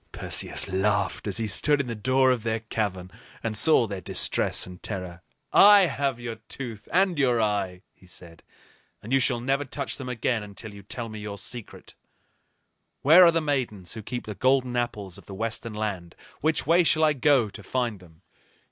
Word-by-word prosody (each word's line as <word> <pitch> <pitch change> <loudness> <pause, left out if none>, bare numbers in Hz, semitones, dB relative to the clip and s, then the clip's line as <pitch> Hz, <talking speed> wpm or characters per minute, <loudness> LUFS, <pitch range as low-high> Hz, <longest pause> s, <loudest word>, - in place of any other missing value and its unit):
Perseus - - 0
laughed 95 +2 -1
as - - -2
he 115 - -1
stood 145 +8 +2
in 140 - -1
the 120 - -4
door 130 +4 +2
of 125 -3 0
their 110 0 -2
cavern 95 -5 -3 0.3
and 110 -2 -2
saw 130 +1 +4
their 100 -3 -6
distress - - 0
and 90 -1 -12
terror. 90 -4 -6 0.3
"I 205 0 +8
have 140 -7 0
your 120 -2 -6
tooth 115 -6 -6
and 180 -2 +2
your 125 -4 +2
eye," 100 -4 -1
he 95 - -22
said, 85 -2 -11 0.6
"and 115 +5 -5
you 135 - +5
shall 120 -2 +2
never 135 +4 0
touch 140 0 -4
them 130 -2 -7
again 120 -1 -1
until 105 +1 -9
you 100 - -11
tell 115 +4 -5
me 110 -1 -8
your 105 -1 -6
secret. 115 +3 -9 1.1
Where 165 +6 +8
are 170 - +7
the 165 0 0
Maidens 125 - -2
who 110 - -7
keep 120 +3 -6
the 105 - -5
golden 130 +2 +1
apples 105 -6 -3
of - - -19
the 100 - -8
Western 115 +1 -4
Land? 100 -6 -4 0.2
Which 155 +1 +1
way 170 +4 +4
shall 160 -1 +3
I 155 -1 +4
go 135 -5 +3
to - - -10
find 120 0 -2
them?" 85 -1 -19
115 Hz, 190 wpm, -26 LUFS, 100-135 Hz, 1.1 s, I